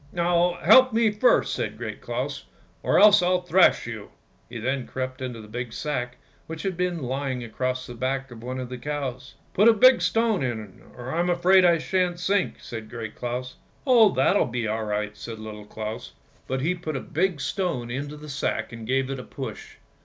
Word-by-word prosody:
" -, -, -26 dB
Now, 175 Hz, 0 st, +2 dB
help 255 Hz, +7 st, +7 dB
me 225 Hz, -1 st, +3 dB
first," -, -, +3 dB
said -, -, -3 dB
Great -, -, -6 dB
Claus, -, -, -4 dB, 0.2 s
" -, -, -34 dB
or -, -, +2 dB
else 205 Hz, -2 st, +8 dB
I'll 180 Hz, 0 st, +1 dB
thrash 180 Hz, +1 st, +4 dB
you." -, -, -7 dB, 0.4 s
He 120 Hz, -, -7 dB
then 130 Hz, +3 st, -2 dB
crept 130 Hz, 0 st, -5 dB
into 125 Hz, -2 st, -4 dB
a -, -, -12 dB
big 120 Hz, +2 st, -5 dB
sack 125 Hz, -3 st, -3 dB, 0.3 s
which 160 Hz, 0 st, -6 dB
had 190 Hz, -2 st, -2 dB
been 180 Hz, -3 st, -2 dB
lying 130 Hz, 0 st, -3 dB
across 130 Hz, +2 st, -3 dB
the 120 Hz, -, -8 dB
back 130 Hz, +2 st, -3 dB
of 115 Hz, -2 st, -10 dB
one 130 Hz, +2 st, -5 dB
of 125 Hz, -1 st, -5 dB
the 125 Hz, -1 st, -7 dB
cows. 130 Hz, -3 st, -5 dB
" -, -, -35 dB
Put 210 Hz, +4 st, +6 dB
a -, -, +7 dB
big 255 Hz, +4 st, +6 dB
stone 225 Hz, -5 st, +1 dB
in, 110 Hz, -7 st, -4 dB, 0.2 s
or 125 Hz, +1 st, -6 dB
I'm 175 Hz, +2 st, +1 dB
afraid 180 Hz, +2 st, +5 dB
I 170 Hz, -1 st, +5 dB
shan't 180 Hz, +1 st, -1 dB
sink," 195 Hz, +1 st, 0 dB
said 110 Hz, -2 st, -8 dB
Great 115 Hz, -2 st, -6 dB
Claus. 125 Hz, +1 st, -5 dB
" -, -, -35 dB
Oh, 235 Hz, -6 st, +6 dB
that'll 130 Hz, +1 st, +2 dB
be 120 Hz, -2 st, -2 dB
all 110 Hz, +1 st, -2 dB
right," 105 Hz, 0 st, -2 dB
said 115 Hz, -1 st, -8 dB
Little 105 Hz, -1 st, -9 dB
Claus, 110 Hz, +1 st, -6 dB, 0.3 s
but 130 Hz, 0 st, -2 dB
he 165 Hz, +6 st, +1 dB
put 165 Hz, -4 st, -5 dB
a -, -, -2 dB
big 170 Hz, +3 st, -1 dB
stone 140 Hz, -8 st, -2 dB
into 145 Hz, +4 st, -5 dB
the 150 Hz, +1 st, -11 dB
sack 140 Hz, -2 st, -2 dB
and 115 Hz, -2 st, -8 dB
gave 130 Hz, +1 st, 0 dB
it 135 Hz, -, -4 dB
a -, -, -7 dB
push. 130 Hz, -6 st, -8 dB
135 Hz, 215 wpm, -25 LUFS, 120-180 Hz, 0.4 s, else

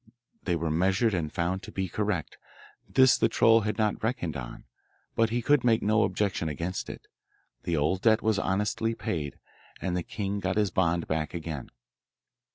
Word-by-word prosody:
They 90 Hz, -, +1 dB
were 80 Hz, -1 st, -1 dB
measured 95 Hz, +7 st, +2 dB
and 80 Hz, -4 st, -1 dB
found 90 Hz, +3 st, -1 dB
to -, -, -10 dB
be 95 Hz, -1 st, -2 dB
correct. 100 Hz, -3 st, -2 dB, 0.5 s
This 130 Hz, -1 st, +5 dB
the 115 Hz, -, +3 dB
troll 115 Hz, 0 st, +5 dB
had 105 Hz, +1 st, -2 dB
not 110 Hz, -2 st, 0 dB
reckoned 110 Hz, -, -2 dB
on, -, -, -7 dB, 0.5 s
but 115 Hz, 0 st, +3 dB
he 120 Hz, +1 st, -1 dB
could 145 Hz, 0 st, +3 dB
make 115 Hz, -2 st, +3 dB
no 110 Hz, +1 st, +3 dB
objection 95 Hz, -4 st, 0 dB
against 85 Hz, +5 st, -4 dB
it. -, -, -9 dB, 0.6 s
The 85 Hz, -2 st, 0 dB
old 80 Hz, +6 st, +1 dB
debt 110 Hz, 0 st, +4 dB
was 110 Hz, -2 st, +2 dB
honestly 105 Hz, +4 st, 0 dB
paid, 75 Hz, -9 st, -3 dB, 0.4 s
and 90 Hz, -2 st, -2 dB
the 90 Hz, -, 0 dB
king 100 Hz, +3 st, -3 dB
got 95 Hz, +1 st, -1 dB
his 105 Hz, -3 st, +2 dB
bond 85 Hz, -2 st, +1 dB
back 80 Hz, +1 st, -2 dB
again. 80 Hz, -5 st, -5 dB
95 Hz, 175 wpm, -28 LUFS, 85-110 Hz, 0.6 s, This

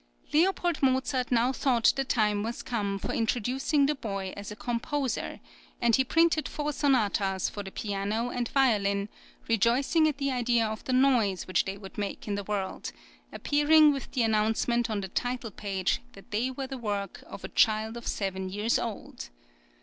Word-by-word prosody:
Leopold 350 Hz, 0 st, +2 dB
Mozart 260 Hz, -1 st, +1 dB
now 245 Hz, +2 st, +3 dB
thought 250 Hz, -4 st, +3 dB
the 270 Hz, -, 0 dB
time 210 Hz, -5 st, +1 dB
was 230 Hz, +3 st, -4 dB
come 205 Hz, -5 st, -2 dB
for -, -, -4 dB
introducing 250 Hz, +6 st, +1 dB
the 295 Hz, -, +2 dB
boy 195 Hz, -8 st, -4 dB
as 200 Hz, 0 st, -7 dB
a -, -, -6 dB
composer, 245 Hz, +3 st, -2 dB, 0.4 s
and 235 Hz, -2 st, +4 dB
he 265 Hz, -, +3 dB
printed 320 Hz, +2 st, +2 dB
four 300 Hz, 0 st, -3 dB
sonatas 205 Hz, -, +1 dB
for 205 Hz, -, -6 dB
the 195 Hz, -, -7 dB
piano 205 Hz, +4 st, -2 dB
and 245 Hz, -1 st, -2 dB
violin, 205 Hz, -6 st, +2 dB, 0.4 s
rejoicing 245 Hz, -, +3 dB
at 300 Hz, -3 st, -1 dB
the 275 Hz, -1 st, -1 dB
idea 240 Hz, -2 st, +2 dB
of 215 Hz, 0 st, -4 dB
the -, -, -2 dB
noise 250 Hz, -8 st, +3 dB
which 185 Hz, 0 st, +1 dB
they 195 Hz, 0 st, -4 dB
would 195 Hz, 0 st, -10 dB
make 205 Hz, +1 st, -4 dB
in 205 Hz, -, -1 dB
the 200 Hz, 0 st, -2 dB
world, 200 Hz, -2 st, -3 dB, 0.4 s
appearing 295 Hz, +1 st, +4 dB
with 275 Hz, -3 st, -6 dB
the 250 Hz, -, +2 dB
announcement 225 Hz, +2 st, +1 dB
on 210 Hz, -2 st, -1 dB
the 190 Hz, -, -4 dB
title 245 Hz, +3 st, -3 dB
page 195 Hz, -1 st, -1 dB
that 200 Hz, +4 st, -15 dB
they 225 Hz, +5 st, 0 dB
were 265 Hz, +1 st, -5 dB
the 265 Hz, -1 st, -6 dB
work 205 Hz, -3 st, -4 dB
of -, -, -9 dB
a -, -, -4 dB
child 220 Hz, 0 st, +2 dB
of 235 Hz, -, -7 dB
seven 190 Hz, -1 st, -2 dB
years 210 Hz, +4 st, 0 dB
old. 205 Hz, -, -6 dB
230 Hz, 180 wpm, -28 LUFS, 205-265 Hz, 0.4 s, and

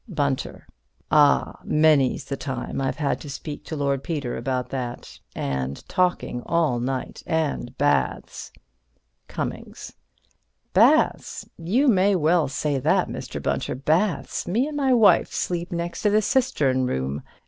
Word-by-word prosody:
Bunter: 140 Hz, -7 st, -2 dB, 0.5 s
Ah, 145 Hz, -2 st, +4 dB
many's 150 Hz, -4 st, +3 dB
the 140 Hz, -, -3 dB
time 130 Hz, -1 st, -4 dB
I've 135 Hz, -, -1 dB
had 145 Hz, -2 st, -1 dB
to 145 Hz, -, -8 dB
speak 145 Hz, +2 st, -7 dB
to 160 Hz, -, -5 dB
Lord 140 Hz, -2 st, -1 dB
Peter 145 Hz, -7 st, -3 dB
about 125 Hz, +1 st, -2 dB
that. 125 Hz, -3 st, -6 dB, 0.2 s
And 70 Hz, 0 st, -3 dB
talking 180 Hz, -9 st, 0 dB
all 160 Hz, -8 st, +1 dB
night. 130 Hz, +1 st, -3 dB
And 155 Hz, -6 st, -2 dB
baths. 145 Hz, +1 st, 0 dB, 0.8 s
Cummings: -, -, -6 dB, 0.8 s
Baths? -, -, +3 dB
You 220 Hz, -, +1 dB
may 200 Hz, -3 st, +4 dB
well 165 Hz, -2 st, +3 dB
say 140 Hz, +1 st, -1 dB
that, -, -, +2 dB
Mr. -, -, -6 dB
Bunter. -, -, -2 dB
Baths? 160 Hz, +9 st, 0 dB
Me 225 Hz, +9 st, +1 dB
and 300 Hz, 0 st, -5 dB
my 275 Hz, -2 st, +1 dB
wife 225 Hz, -5 st, +5 dB
sleep 175 Hz, 0 st, -3 dB
next 170 Hz, 0 st, -3 dB
to 210 Hz, -, +3 dB
the 210 Hz, +1 st, +3 dB
cistern 155 Hz, -, +1 dB
room. 65 Hz, -, -2 dB
150 Hz, 135 wpm, -24 LUFS, 130-180 Hz, 0.8 s, wife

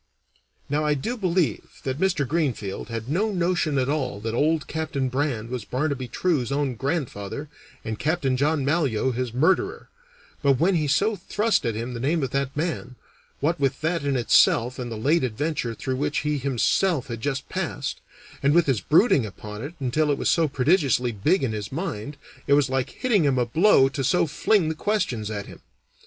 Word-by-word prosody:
Now 150 Hz, +2 st, 0 dB
I 150 Hz, -1 st, +2 dB
do 225 Hz, -, -3 dB
believe 185 Hz, -, -1 dB
that 130 Hz, +1 st, -3 dB
Mr. 175 Hz, -7 st, +1 dB
Greenfield 130 Hz, -, -2 dB
had 115 Hz, 0 st, -5 dB
no 195 Hz, +10 st, 0 dB
notion 175 Hz, -5 st, 0 dB
at 130 Hz, -1 st, +1 dB
all 135 Hz, -8 st, -1 dB
that 115 Hz, +1 st, -3 dB
old 150 Hz, +3 st, +1 dB
Captain 155 Hz, -4 st, -2 dB
Brand 125 Hz, -4 st, -2 dB
was 125 Hz, -4 st, -3 dB
Barnaby 135 Hz, +2 st, -2 dB
True's 135 Hz, -2 st, 0 dB
own 140 Hz, -2 st, 0 dB
grandfather 135 Hz, -, -3 dB, 0.4 s
and 110 Hz, -1 st, -4 dB
Capt. 160 Hz, +2 st, 0 dB
John 145 Hz, +1 st, +1 dB
Malyoe 135 Hz, -6 st, +1 dB
his 125 Hz, 0 st, -2 dB
murderer, 190 Hz, -, +1 dB, 0.5 s
but 140 Hz, -2 st, +4 dB
when 175 Hz, +7 st, +3 dB
he 155 Hz, -4 st, +1 dB
so 200 Hz, +10 st, +2 dB
thrust 210 Hz, -, 0 dB
at 115 Hz, -, -1 dB
him 120 Hz, +3 st, -4 dB
the 120 Hz, -, -5 dB
name 150 Hz, +5 st, 0 dB
of 130 Hz, -, -2 dB
that 140 Hz, 0 st, -2 dB
man, 150 Hz, -6 st, -3 dB, 0.5 s
what 160 Hz, +3 st, +1 dB
with 135 Hz, +1 st, 0 dB
that 165 Hz, 0 st, 0 dB
in 140 Hz, -1 st, 0 dB
itself 120 Hz, 0 st, +3 dB
and 120 Hz, -2 st, -4 dB
the 110 Hz, -, -4 dB
late 150 Hz, +9 st, +2 dB
adventure 125 Hz, 0 st, -2 dB
through 130 Hz, +2 st, -3 dB
which 145 Hz, +2 st, -1 dB
he 150 Hz, -1 st, -1 dB
himself 140 Hz, +4 st, +1 dB
had 115 Hz, -3 st, -6 dB
just 140 Hz, +1 st, -2 dB
passed, -, -, -4 dB, 0.4 s
and 140 Hz, +2 st, +3 dB
with 175 Hz, -1 st, +5 dB
his 130 Hz, -7 st, +1 dB
brooding 160 Hz, -, +4 dB
upon 105 Hz, +1 st, -8 dB
it 155 Hz, +5 st, -7 dB
until 145 Hz, +4 st, +1 dB
it 145 Hz, -, +2 dB
was -, -, +1 dB
so 165 Hz, -2 st, +3 dB
prodigiously 135 Hz, -, +2 dB
big 150 Hz, -, +1 dB
in 125 Hz, -, 0 dB
his 105 Hz, -2 st, -5 dB
mind, 145 Hz, -, -4 dB, 0.3 s
it 140 Hz, -, +4 dB
was 140 Hz, -2 st, +3 dB
like 130 Hz, 0 st, 0 dB
hitting 235 Hz, -8 st, +1 dB
him 140 Hz, -3 st, +2 dB
a 125 Hz, -, +2 dB
blow 155 Hz, -, +5 dB
to 135 Hz, 0 st, -3 dB
so 135 Hz, +8 st, +3 dB
fling 165 Hz, +4 st, +2 dB
the 160 Hz, -, 0 dB
questions 155 Hz, -, -1 dB
at 100 Hz, -2 st, -4 dB
him. -, -, -12 dB
140 Hz, 195 wpm, -24 LUFS, 125-160 Hz, 0.5 s, with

